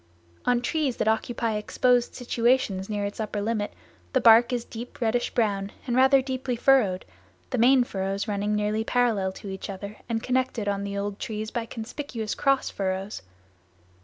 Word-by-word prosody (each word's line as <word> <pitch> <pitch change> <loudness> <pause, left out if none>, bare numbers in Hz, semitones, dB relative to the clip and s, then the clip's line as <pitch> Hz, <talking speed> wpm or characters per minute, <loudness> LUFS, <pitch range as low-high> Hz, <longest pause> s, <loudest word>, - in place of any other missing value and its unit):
On 245 0 +3
trees 280 -2 0
that - - 0
occupy 220 0 0
exposed 245 +3 +1
situations 235 -5 +1
near 205 -1 -1
its 200 +2 -5
upper 215 -1 -2
limit 210 0 -1 0.4
the 260 - +4
bark 235 0 +7
is 245 -2 -1
deep 235 +2 -9
reddish 240 +1 +1
brown 200 -3 0
and 245 -2 -1
rather 265 +1 +5
deeply 260 -1 -2
furrowed, 225 -7 +3 0.5
the 255 - 0
main 255 +2 +6
furrows 195 -2 -3
running 205 0 0
nearly 210 +1 0
parallel 225 -6 +1
to 200 - -9
each 190 +1 -6
other 200 +2 -7
and 225 -1 -1
connected 255 -4 0
on 200 0 -1
the 200 0 -4
old 200 0 -3
trees 215 0 -4
by 235 -2 -3
conspicuous 225 -1 -5
cross 275 -1 +2
furrows. 190 - -3
225 Hz, 165 wpm, -26 LUFS, 205-245 Hz, 0.5 s, bark